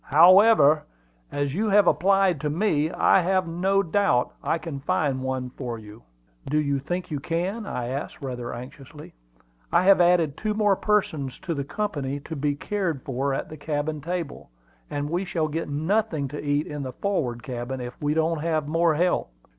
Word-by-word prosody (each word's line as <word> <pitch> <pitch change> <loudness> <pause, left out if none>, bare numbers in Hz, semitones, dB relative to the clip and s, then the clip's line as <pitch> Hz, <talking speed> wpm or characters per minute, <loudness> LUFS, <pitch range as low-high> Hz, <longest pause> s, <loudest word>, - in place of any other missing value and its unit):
"However, 170 -1 +6 0.5
as 145 -1 -1
you 215 +6 0
have 205 0 +5
applied 190 -4 +3
to 150 - -1
me, 155 -2 +1
I 190 - +4
have 185 0 +1
no 190 +4 +1
doubt 165 -8 +1
I 165 - +1
can 160 -4 -6
find 135 -1 0
one 130 -1 -3
for 125 -3 -5
you." 105 +1 -12 0.5
"Do 150 - +1
you 140 -2 +1
think 175 +5 -4
you 145 - -2
can?" 180 +9 -2
I 120 -1 -3
asked, 135 +3 -5
rather 125 -4 -5
anxiously. 135 +4 -10 0.6
"I 175 +2 +4
have 195 -1 +6
added 175 -5 +3
two 215 -1 -2
more 210 -2 +3
persons 160 -11 0
to 170 - -3
the 140 -3 -2
company 145 -5 -3
to 160 - -7
be 145 0 0
cared 170 -4 -2
for 135 +1 -2
at - - -4
the 155 - -9
cabin 150 +1 -3
table, 170 - -5 0.4
and 145 0 -3
we 175 +5 -1
shall 165 -4 -1
get 160 +1 -4
nothing 160 0 0
to 145 +2 -6
eat 145 +1 0
in 150 -1 -6
the 130 -2 -5
forward 130 - -2
cabin 125 +1 -5
if 125 0 -6
we 150 +1 0
don't 160 0 +1
have 155 -2 -1
more 165 +1 +2
help." 175 - +1
155 Hz, 185 wpm, -25 LUFS, 140-180 Hz, 0.6 s, However